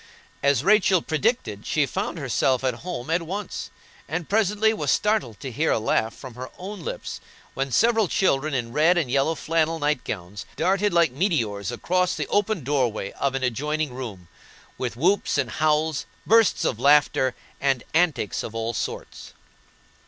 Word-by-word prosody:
As 140 -1 +2
Rachel 195 -3 +4
predicted, 155 - -1
she 150 -2 +2
found 190 +4 -3
herself, 130 -2 +1
at 130 -1 +1
home 155 +1 -6
at 170 +2 +2
once, 190 +4 -5 0.4
and 160 +2 -3
presently 215 +1 +2
was 215 - -2
startled 210 - +1
to 135 - -5
hear 150 +7 0
a - - +3
laugh 110 0 0
from 130 -3 -10
her 125 +2 -7
own 200 +3 -7
lips - - -5 0.3
when 135 0 -2
several 225 - +3
children 155 -5 +1
in 120 -2 -3
red 160 +5 +4
and 150 -8 0
yellow 140 +4 +2
flannel 165 +1 0
night 150 -3 0
gowns 100 +1 -6
darted 195 +2 +1
like 170 -5 +3
meteors 120 - -1
across 180 0 0
the - - -2
open 205 -5 +1
doorway 125 -7 0
of 140 -1 -1
an 135 - -2
adjoining 150 +3 -1
room, 110 -9 -7 0.5
with 120 -2 -4
whoops 185 +9 +2
and - - 0
howls, 155 -1 +1 0.2
bursts 225 -2 +4
of 115 - -1
laughter, 140 -2 +4 0.2
and 135 -3 +1
antics 160 - +1
of 115 - -7
all 115 +1 -2
sorts. 105 - -5
150 Hz, 165 wpm, -24 LUFS, 125-180 Hz, 0.5 s, Rachel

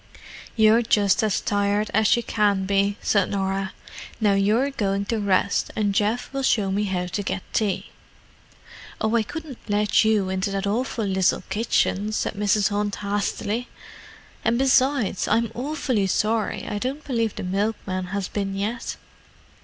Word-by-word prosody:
"You're 220 +1 +5
just 210 -2 +3
as 215 -3 +1
tired 205 +1 0
as 220 +2 +4
you 235 - -1
can 205 -4 +1
be," 200 +1 +1
said 200 -3 +2
Norah. 195 -1 -1 0.5
"Now 210 -3 +3
you're 215 +8 +2
going 200 -5 -1
to 225 +1 -1
rest, 200 -1 +1
and 205 -2 +1
Geoff 220 +6 0
will 275 - -1
show 210 -7 +2
me 205 +2 0
how 185 -2 -1
to 180 +3 -3
get 195 -1 -3
tea." 210 -4 -1 1.1
"Oh, 220 +1 +1
I 230 - +4
couldn't 295 +3 -7
let 210 +2 +3
you 215 -3 +2
into 190 +2 -1
that 195 0 -2
awful 225 +2 -1
little 190 -2 +1
kitchen," 210 -1 +1
said - - -1
Mrs. 205 0 +2
Hunt 205 0 -1
hastily. 205 +3 -2 0.8
"And 235 - +2
besides—I'm 255 -4 +2
awfully 255 -6 -1
sorry—I 210 0 -1
don't 270 +6 -3
believe 230 -5 -1
the - - -5
milkman 190 -1 -2
has 195 +1 -3
been 195 -1 -3
yet." 220 +5 -3
210 Hz, 150 wpm, -24 LUFS, 195-230 Hz, 1.1 s, You're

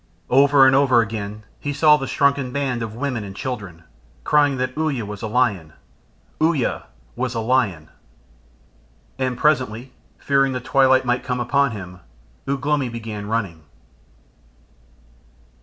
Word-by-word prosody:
Over 140 +1 +6
and 130 0 +5
over 130 -4 +4
again 105 -1 -5 0.2
he 145 - -3
saw 150 +1 +5
the 135 -3 -4
shrunken 140 -2 +1
band 130 -3 -2
of 110 -1 -5
women 125 -3 -3
and 95 -1 -9
children 100 -9 -6 0.4
crying 145 - +3
that 130 0 -3
Uya 150 -8 -1
was 105 0 -8
a - - -3
lion. 105 -9 0 0.7
Uya 155 -5 0 0.3
was 125 0 -3
a - - -1
lion! 110 -9 0 1.3
And 130 -2 -1
presently, 130 -4 0 0.2
fearing 135 -1 +1
the 125 - -2
twilight 130 +1 +3
might 125 0 0
come 125 -1 -2
upon 140 +3 +2
him, 90 -5 -8 0.5
Ugh 140 0 -2
lomi 145 -4 +1
began 110 -3 -6
running. 100 -8 -3
125 Hz, 140 wpm, -21 LUFS, 110-140 Hz, 1.3 s, Over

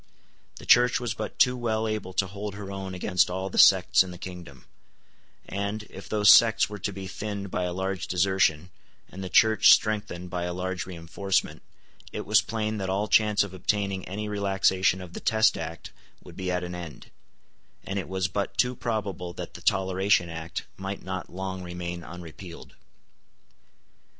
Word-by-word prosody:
The - - -11
Church 125 0 +5
was 120 -3 -2
but 110 -1 -6
too 125 0 +4
well 110 -2 -1
able 110 -3 -3
to 95 - +1
hold 100 +1 -6
her 100 -1 -7
own 95 -1 -5
against 90 0 +2
all 95 +1 -3
the - - 0
sects 95 -1 +6
in 95 - -1
the 90 - -9
kingdom; 85 -7 -10 0.8
and, 100 +2 -3
if 95 - -10
those 105 -1 +6
sects 115 -3 +6
were 105 0 -8
to 100 - -2
be 95 0 -7
thinned 100 0 -5
by 90 - -1
a 90 - -2
large 95 +1 -3
desertion, 90 -2 +1 0.4
and 95 +1 -7
the 95 - -5
Church 110 +2 +6
strengthened 95 -5 +1
by 90 -1 -2
a 90 0 -3
large 95 0 -3
reinforcement, 90 -1 -2 0.5
it - - -5
was 105 +1 +5
plain 110 -2 -3
that 95 -1 -3
all 100 +3 0
chance 105 -2 +4
of 100 -2 -8
obtaining 95 +1 -1
any 105 +3 -4
relaxation 95 -2 +1
of 90 -2 -10
the - - -5
Test 110 0 +3
Act 80 0 -7 0.3
would - - -13
be 95 -1 -4
at 90 0 -1
an 90 0 -5
end; 85 -3 -9 0.7
and 95 +1 -3
it 95 - -6
was 95 -1 0
but 100 +2 -3
too 125 0 +2
probable 100 -7 -3
that 85 -1 -7
the 90 - -10
Toleration 95 0 +2
Act 80 0 -6
might 95 +1 -5
not 95 0 -5
long 95 0 -5
remain 90 -1 -6
unrepealed. 85 0 -10
95 Hz, 180 wpm, -26 LUFS, 90-105 Hz, 0.8 s, sects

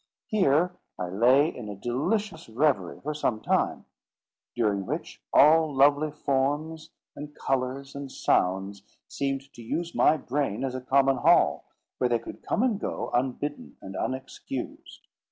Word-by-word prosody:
Here 180 -4 +2 0.3
I 90 - -3
lay 125 - +4
in 110 -4 -7
a 100 - -5
delicious 160 - -2
reverie 115 - 0
for 150 +2 -2
some 125 -7 -1
time; - - 0 0.7
during 105 -5 0
which - - -5
all 155 +1 +6
lovely 145 +2 +4
forms, 150 +2 -1 0.3
and 150 0 -9
colours, 135 +1 -2
and 140 -1 -7
sounds 95 0 0 0.3
seemed 135 0 -3
to 120 - -11
use 170 +9 -3
my 160 - +4
brain 135 -4 -2
as 130 -2 -2
a 130 - -4
common 135 +1 +3
hall, - - +4 0.3
where 125 - +2
they 120 - +3
could 115 - -10
come 220 - 0
and 230 -6 +1
go, - - -4
unbidden 130 +4 -2
and 95 0 -9
unexcused. 130 0 -6
135 Hz, 145 wpm, -27 LUFS, 120-150 Hz, 0.7 s, all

